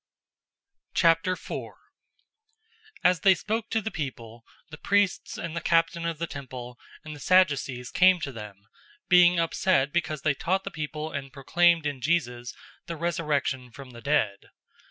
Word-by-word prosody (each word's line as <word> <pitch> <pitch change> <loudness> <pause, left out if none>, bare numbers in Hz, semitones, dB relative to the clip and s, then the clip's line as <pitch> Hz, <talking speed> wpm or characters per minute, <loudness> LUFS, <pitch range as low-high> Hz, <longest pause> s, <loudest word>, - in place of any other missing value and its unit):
004:001 170 +2 +1 1.3
As 180 -2 +4
they 190 +3 +5
spoke 220 +6 -3
to 225 - 0
the 220 - -4
people, 120 -6 -6 0.3
the 155 - -8
priests 205 -2 +1
and 170 -1 -5
the 170 - -2
captain 170 0 +1
of 165 -2 -3
the 170 - -2
temple 125 -5 -8 0.3
and 155 -1 -7
the - - -12
Sadducees 140 -8 +2
came 185 0 +5
to 140 - -3
them, 105 -4 -9
004:002 100 - -33 0.5
being 180 -1 +6
upset 165 -4 +1
because 155 -4 -1
they 155 - +3
taught 190 +7 -1
the 195 - -6
people 155 0 -5
and 135 -1 -5
proclaimed 170 +4 +2
in 140 -3 -3
Jesus 125 -6 -1 0.4
the 170 - -4
resurrection 150 -6 -1
from 135 0 -11
the 120 -1 -12
dead. 110 -9 0
155 Hz, 155 wpm, -27 LUFS, 135-175 Hz, 1.3 s, being